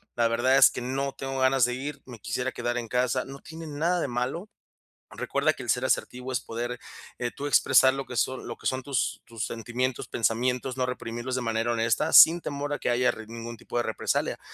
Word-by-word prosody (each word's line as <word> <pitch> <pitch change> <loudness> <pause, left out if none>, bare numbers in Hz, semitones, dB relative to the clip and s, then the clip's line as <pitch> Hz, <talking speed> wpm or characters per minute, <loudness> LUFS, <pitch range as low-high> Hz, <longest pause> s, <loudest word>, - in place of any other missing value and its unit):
la 120 -1 +3
verdad 125 +4 +3
es - - +8
que - - -5
no 135 +2 -2
tengo 135 0 -4
ganas 130 -1 +4
de 125 - -2
ir. 140 +2 -6
Me 120 -4 -11
quisiera 125 +4 -2
quedar 120 0 -2
en 120 -2 -3
casa". 125 +2 0
No 135 +1 -9
tiene 165 +1 -9
nada 165 +4 0
de 145 - -1
malo. 130 - -3 0.7
Recuerda - - 0
que - - -9
el - - -7
ser - - +2
asertivo 125 +1 -1
es 125 - 0
poder, 120 +1 -5 0.4
eh, 120 -1 -2
tú 140 - -5
expresar 130 -2 +5
lo 135 0 -4
que 125 - -8
son 130 +3 -1
lo - - -5
que - - -17
son 130 0 0
tus 135 -2 -1
tus 115 -3 -5
sentimientos, 120 +2 -3
pensamientos, 125 +3 0
no 130 - +1
reprimirlos 120 0 -4
de 130 - -1
manera 115 0 0
honesta 115 +7 +1
sin 170 +2 +9
temor 145 -2 -4
a 145 - -2
que - - -1
haya 125 +1 +3
r 110 - -4
ningún 115 0 -7
tipo - - -10
de 120 - +2
represalia. - - -1
125 Hz, 225 wpm, -27 LUFS, 120-135 Hz, 0.7 s, sin